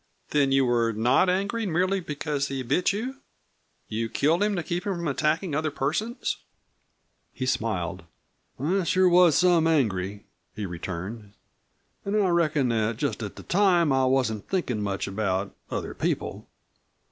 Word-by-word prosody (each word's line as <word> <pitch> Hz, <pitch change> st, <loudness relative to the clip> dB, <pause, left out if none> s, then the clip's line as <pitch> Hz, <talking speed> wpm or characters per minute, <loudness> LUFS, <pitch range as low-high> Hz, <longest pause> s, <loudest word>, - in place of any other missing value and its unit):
"Then 140 Hz, -2 st, +3 dB
you 135 Hz, 0 st, +4 dB
were 120 Hz, -2 st, +2 dB
not 120 Hz, -, +3 dB
angry 200 Hz, +4 st, 0 dB
merely 185 Hz, +3 st, +1 dB
because 150 Hz, -4 st, -2 dB
he 135 Hz, -1 st, -3 dB
bit 145 Hz, +11 st, +2 dB
you? 245 Hz, +7 st, -4 dB, 0.7 s
You 115 Hz, +1 st, -2 dB
killed 160 Hz, -, +2 dB
him 205 Hz, 0 st, +2 dB
to 175 Hz, -, -2 dB
keep 175 Hz, +3 st, -3 dB
him 200 Hz, -2 st, -2 dB
from 170 Hz, -1 st, -3 dB
attacking 155 Hz, +4 st, 0 dB
other 155 Hz, +2 st, 0 dB
persons?" 165 Hz, -, -2 dB, 0.9 s
He 130 Hz, -, -4 dB
smiled. 95 Hz, -8 st, -2 dB, 0.5 s
"I 180 Hz, +8 st, +1 dB
sure 185 Hz, +2 st, +3 dB
was 175 Hz, -3 st, +6 dB
some 175 Hz, -3 st, +4 dB
angry," 105 Hz, -, 0 dB, 0.3 s
he 105 Hz, -, -4 dB
returned. 95 Hz, +4 st, -6 dB, 0.7 s
"An' 200 Hz, +1 st, -2 dB
I 195 Hz, -3 st, +3 dB
reckon 155 Hz, -6 st, +2 dB
that 110 Hz, -1 st, 0 dB
just 140 Hz, -2 st, -2 dB
at 105 Hz, -, -5 dB
the -, -, -10 dB
time 175 Hz, -6 st, +3 dB
I 130 Hz, 0 st, +3 dB
wasn't 130 Hz, -5 st, 0 dB
thinkin' 130 Hz, -, -1 dB
much 100 Hz, -2 st, -2 dB
about 100 Hz, -1 st, -1 dB, 0.2 s
other -, -, -4 dB
people. -, -, -3 dB
145 Hz, 155 wpm, -26 LUFS, 110-180 Hz, 0.9 s, was